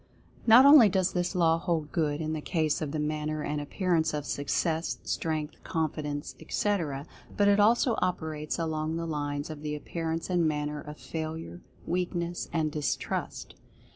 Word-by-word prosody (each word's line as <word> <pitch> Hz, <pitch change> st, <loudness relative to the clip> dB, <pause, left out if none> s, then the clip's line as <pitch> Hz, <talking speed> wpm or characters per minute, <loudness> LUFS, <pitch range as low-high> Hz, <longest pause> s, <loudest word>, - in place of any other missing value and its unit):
Not 235 Hz, +4 st, +9 dB
only 280 Hz, -7 st, +9 dB
does 190 Hz, -1 st, +1 dB
this 180 Hz, +1 st, -1 dB
law 165 Hz, -2 st, +3 dB
hold 165 Hz, -4 st, -1 dB
good 150 Hz, -2 st, 0 dB
in 155 Hz, 0 st, -2 dB
the 155 Hz, -, -3 dB
case 155 Hz, -2 st, 0 dB
of 155 Hz, -, -2 dB
the 155 Hz, -, -2 dB
manner 150 Hz, 0 st, -2 dB
and 150 Hz, 0 st, -2 dB
appearance 160 Hz, 0 st, 0 dB
of 145 Hz, -1 st, -3 dB
Success, 160 Hz, +4 st, -1 dB
Strength, 155 Hz, -2 st, -3 dB
Confi 155 Hz, -2 st, -1 dB
dence, 145 Hz, -1 st, -4 dB
etc., 160 Hz, -5 st, -1 dB, 0.3 s
but 205 Hz, -, +4 dB
it 205 Hz, 0 st, +5 dB
also 230 Hz, +3 st, +4 dB
operates 155 Hz, -4 st, -2 dB
along 160 Hz, -1 st, -2 dB
the 165 Hz, -, -3 dB
lines 145 Hz, -1 st, -3 dB
of 150 Hz, -2 st, -8 dB
the 150 Hz, 0 st, -3 dB
appearance 165 Hz, +2 st, -3 dB
and 175 Hz, -3 st, +2 dB
manner 150 Hz, -1 st, -2 dB
of 150 Hz, 0 st, -9 dB
Failure, 160 Hz, +2 st, -6 dB, 0.2 s
Weakness, 175 Hz, -1 st, -2 dB
and 160 Hz, -2 st, 0 dB
Distrust. 150 Hz, -1 st, -3 dB
160 Hz, 165 wpm, -29 LUFS, 150-175 Hz, 0.3 s, Not